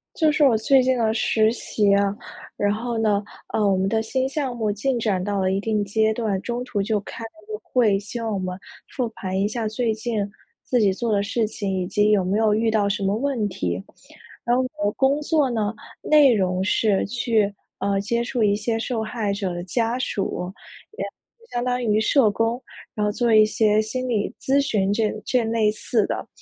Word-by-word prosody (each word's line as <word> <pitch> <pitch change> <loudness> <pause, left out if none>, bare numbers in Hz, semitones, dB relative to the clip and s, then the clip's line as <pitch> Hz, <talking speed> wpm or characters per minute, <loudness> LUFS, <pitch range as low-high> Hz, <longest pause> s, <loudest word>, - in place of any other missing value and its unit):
就 315 -2 +3
是 300 0 +2
我 245 -5 +5
最 265 +5 +4
近 255 0 +2
的 220 -2 +1
实 220 0 +2
习 205 -4 +1
啊， 200 0 +2 0.4
然 205 0 +1
后 235 +2 -3
呢， 210 -2 +1 0.3
呃， 215 - +2
我 195 -1 +3
们 190 +1 +1
的 220 +2 +1
新 260 +4 -1
项 270 -2 -3
目 220 -3 0
进 240 +5 -1
展 200 -5 0
到 205 0 -1
了 190 0 +1
一 195 - 0
定 210 0 0
阶 220 +2 +2
段， 215 -4 -1
中 240 +3 -3
途 250 -5 -2
就 210 +1 0
开 230 - -9
了 225 - -6 0.2
个 430 -1 -5
会， 225 -6 +2
希 210 +4 -7
望 225 -2 -2
我 200 - -1
们 185 -1 -4 0.4
复 250 -3 0
盘 190 -4 -4
一 200 - +2
下 220 +1 -2
最 220 +1 0
近 215 -2 -2 0.3
自 250 - +1
己 205 -3 +4
做 225 +4 -2
的 200 - +2
事 225 +1 0
情， 205 -2 -4
以 - - -2
及 210 +2 +2
有 205 -3 +3
没 190 +3 +1
有 220 -1 +3
遇 225 +2 +1
到 210 -2 +2
什 200 0 -1
么 195 +1 +1
问 245 -3 -1
题。 90 - -3 0.6
然 240 +1 +2
后 260 - +2
我 205 - -1
的 205 - +2
工 275 +2 +2
作 300 -3 +2
呢， 220 -3 -1 0.3
内 295 -4 +5
容 185 -3 0
是 205 0 +2
去， 220 -2 0 0.2
呃， 200 0 0
接 235 +3 -1
触 240 -1 -1
一 205 -1 +3
些 225 +2 -1
受 230 0 -2
害 215 -2 -2
者 200 -2 -2
的 175 0 -5
家 230 +5 -1
属， 190 -6 -2 0.5
也 - - -2 0.5
相 240 - -1
当 250 0 0
于 215 -1 +2
社 220 0 +4
工， 225 +4 -1 0.3
然 210 - 0
后 210 - +1
做 235 +1 +1
一 215 0 +7
些 215 0 +2
心 255 +4 -3
理 215 -4 -1
咨 275 +1 +2
询， 205 -8 +1
这 215 0 +1
这 250 -2 +1
类 225 -1 +2
似 215 0 0
的 - - -4
220 Hz, 235 characters per minute, -23 LUFS, 205-240 Hz, 0.6 s, 一